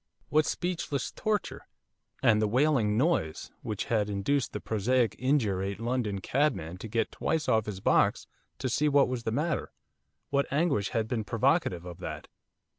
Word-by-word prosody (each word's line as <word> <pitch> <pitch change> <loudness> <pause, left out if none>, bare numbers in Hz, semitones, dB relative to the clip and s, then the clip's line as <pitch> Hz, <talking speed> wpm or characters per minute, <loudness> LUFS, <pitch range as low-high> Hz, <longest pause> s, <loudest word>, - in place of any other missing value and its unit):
what 155 0 +3
speechless 170 -6 -2
torture? 215 -1 -2 0.6
And 110 -2 +5
the 110 - +2
'wailing 120 -3 +2
noise,' 125 - 0
which 105 -2 -3
had 105 -3 +1
induced 110 +7 0
the - - -4
prosaic, 115 +3 +1
indurated 100 -8 0
London 115 -4 -1
cabman 95 - 0
to 110 - -6
get 115 0 -1
twice 160 -2 -1
off 110 -1 +2
his 95 -2 -5
box - - +3 0.3
to 130 - -2
see 150 +5 +2
what 140 -1 +4
was 125 -2 -4
the 110 - 0
matter, 155 +6 -1 0.6
what 140 0 +1
anguish 140 - +1
had 110 -1 -1
been 110 -1 -1
provocative 115 - +1
of 90 -1 -8
that? - - -6
115 Hz, 160 wpm, -29 LUFS, 105-145 Hz, 0.6 s, And